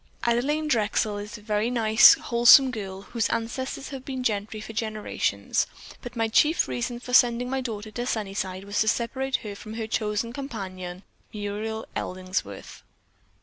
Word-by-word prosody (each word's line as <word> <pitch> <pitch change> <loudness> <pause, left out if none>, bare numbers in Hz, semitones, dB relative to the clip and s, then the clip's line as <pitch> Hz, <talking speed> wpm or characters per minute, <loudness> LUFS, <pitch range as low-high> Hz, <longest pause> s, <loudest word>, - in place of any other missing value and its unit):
Adelaine 280 +7 +1
Drexel 215 -4 +1
is 210 +3 -7
a 210 - -16
very 210 +1 0
nice, 220 -2 +7
wholesome 240 +3 +6
girl, 195 -4 -6
whose 230 +3 -1
ancestors 260 +4 -3
have 270 -2 -7
been 260 -1 -4
gentry 215 -1 -2
for 220 +1 -8
generations, 215 -1 -1 0.3
but 245 0 -8
my 225 -1 +1
chief 300 +9 +3
reason 240 0 -3
for 250 0 -8
sending 245 0 +4
my 265 0 0
daughter 215 -3 -5
to 240 +3 -4
Sunnyside 195 -4 -3
was 200 +1 -2
to 220 - +2
separate 260 +4 0
her 205 - -5
from 215 +2 -9
her 225 -1 -3
chosen 220 +1 -2
companion, 190 -9 -6 0.3
Muriel 215 +1 -4
Ellingworth. 185 - -4
225 Hz, 155 wpm, -26 LUFS, 205-245 Hz, 0.3 s, nice